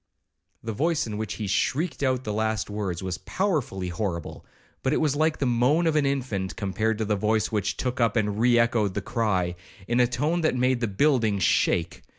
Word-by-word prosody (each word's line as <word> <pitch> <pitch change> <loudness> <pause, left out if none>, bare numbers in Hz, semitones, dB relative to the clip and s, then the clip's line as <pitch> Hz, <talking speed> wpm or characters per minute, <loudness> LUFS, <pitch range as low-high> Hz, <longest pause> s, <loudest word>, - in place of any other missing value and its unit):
The 115 -1 -3
voice 160 +7 0
in 105 -2 -5
which 110 -1 -3
he 110 - -4
shrieked 140 - 0
out 130 -2 +1
the 105 - -3
last 110 -1 -1
words 95 -4 -3
was 90 -1 -3
powerfully 140 - -2
horrible, 85 -2 -4 0.4
but - - 0
it - - +2
was 150 -3 +1
like 155 +1 +1
the 140 - -1
moan 125 +7 +2
of 160 -1 +2
an 145 -2 +3
infant, 105 - -2
compared 110 +4 -1
to 110 - -1
the 105 0 +1
voice 110 +1 0
which 105 -4 -1
took 125 -1 -2
up 115 -1 +2
and 105 -2 0
re 120 +1 +4
echoed 115 -4 +2
the 105 - -1
cry, 105 -6 0 0.3
in 120 +1 +1
a 125 - +5
tone 150 +8 0
that 155 - +1
made 125 0 +2
the 120 - 0
building 110 -1 +2
shake. 85 -3 +1
115 Hz, 205 wpm, -26 LUFS, 105-130 Hz, 0.4 s, a